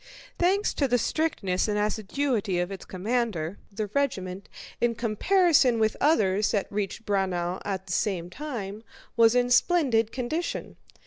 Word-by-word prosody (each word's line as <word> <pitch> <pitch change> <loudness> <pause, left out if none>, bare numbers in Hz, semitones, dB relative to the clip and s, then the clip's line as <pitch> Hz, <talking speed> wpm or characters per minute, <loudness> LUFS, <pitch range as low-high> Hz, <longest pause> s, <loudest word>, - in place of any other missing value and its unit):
Thanks 385 +4 +2
to 280 - +1
the 245 -1 +3
strictness 215 - 0
and 210 -1 0
assiduity 215 0 -1
of 175 +2 -1
its 195 - -7
commander 200 -4 -2
the 210 +2 -3
regiment, 200 -6 -2 0.3
in 240 -1 +1
comparison 255 - +3
with 220 -1 +1
others 210 -9 +3
that 200 -3 0
had - - -28
reached 205 +2 -3
Braunau 185 -3 -1
at 190 -2 -3
the 180 - -4
same 175 -2 -1
time, 220 -8 -6 0.3
was 230 0 +5
in 245 0 +2
splendid 245 -8 +3
condition. 285 +7 -3
215 Hz, 145 wpm, -27 LUFS, 195-250 Hz, 0.3 s, was